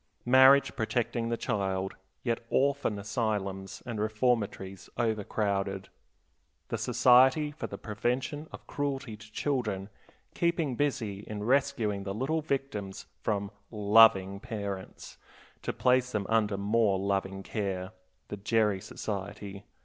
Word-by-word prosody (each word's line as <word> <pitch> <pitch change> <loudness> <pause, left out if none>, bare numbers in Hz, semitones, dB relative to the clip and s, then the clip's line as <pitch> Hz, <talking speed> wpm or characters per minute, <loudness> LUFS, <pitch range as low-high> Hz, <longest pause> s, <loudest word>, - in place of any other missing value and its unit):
Marriage 130 +2 +6
protecting 115 0 -1
the 115 - 0
child, 95 -3 -1 0.3
yet 115 -1 -1
orphan 140 -5 +1
asylums 100 -2 -3
and 115 -3 -4
reformatories 105 -4 -1
overcrowded, 100 -3 -1 0.8
the - - -1
Society 130 +4 +5
for 150 - -5
the - - -7
Prevention 125 +7 -2
of - - -10
Cruelty 140 -5 -3
to 105 +1 -15
Children 110 -7 -2 0.4
keeping 170 -5 0
busy 115 -8 -1
in 105 -1 -5
rescuing 115 -5 +1
the 100 0 -4
little 140 +8 0
victims 135 -10 -3 0.2
from 100 -1 -1 0.2
"loving" 100 -2 +5
parents, 100 -3 -6 0.4
to - - -2
place 125 0 +2
them 105 -2 -1
under 105 -3 +2
more 105 0 +2
loving 95 0 -1
care, 95 -3 -3 0.4
the 105 - -5
Gerry 105 -1 +1
Society. 100 0 -6
110 Hz, 120 wpm, -30 LUFS, 100-125 Hz, 0.8 s, Marriage